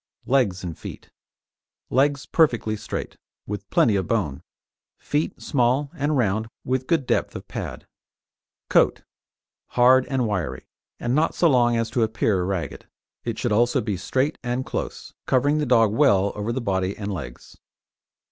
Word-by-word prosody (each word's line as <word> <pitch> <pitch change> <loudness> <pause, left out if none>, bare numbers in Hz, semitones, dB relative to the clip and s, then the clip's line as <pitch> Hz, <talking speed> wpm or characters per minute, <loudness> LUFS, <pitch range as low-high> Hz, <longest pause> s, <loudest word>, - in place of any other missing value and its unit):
LEGS 120 -9 +1
AND 85 -4 -6
FEET - - -9 0.8
Legs 140 +2 +2
perfectly 120 -9 +2
straight, 105 - -6 0.3
with 100 0 -6
plenty 110 -4 +3
of 95 - -1
bone; 90 -13 -1 0.6
feet 150 +2 -2
small 135 +2 +1
and 145 +1 0
round 110 -2 +1 0.2
with 130 0 -1
good 165 -6 +1
depth - - 0
of - - -8
pad. - - -6 0.8
COAT - - +3 0.6
Hard 125 +1 +4
and 130 -4 0
wiry, 85 -11 -3 0.3
and 120 - -1
not 155 +4 +2
so 175 - +4
long 120 -5 +3
as 115 -1 -1
to 120 - 0
appear 110 -4 +1
ragged; 95 -2 -4 0.4
it 115 -2 -3
should 120 - -1
also 120 +4 +3
be 105 -4 -2
straight 130 - -1
and 125 +1 -2
close, - - -5
covering 145 +4 +2
the 150 - -1
dog 115 -4 +4
well 100 -8 +4
over 105 +2 -3
the 125 - -2
body 95 -3 -1
and 105 -1 -4
legs. 90 - -8
120 Hz, 155 wpm, -24 LUFS, 105-130 Hz, 0.8 s, Hard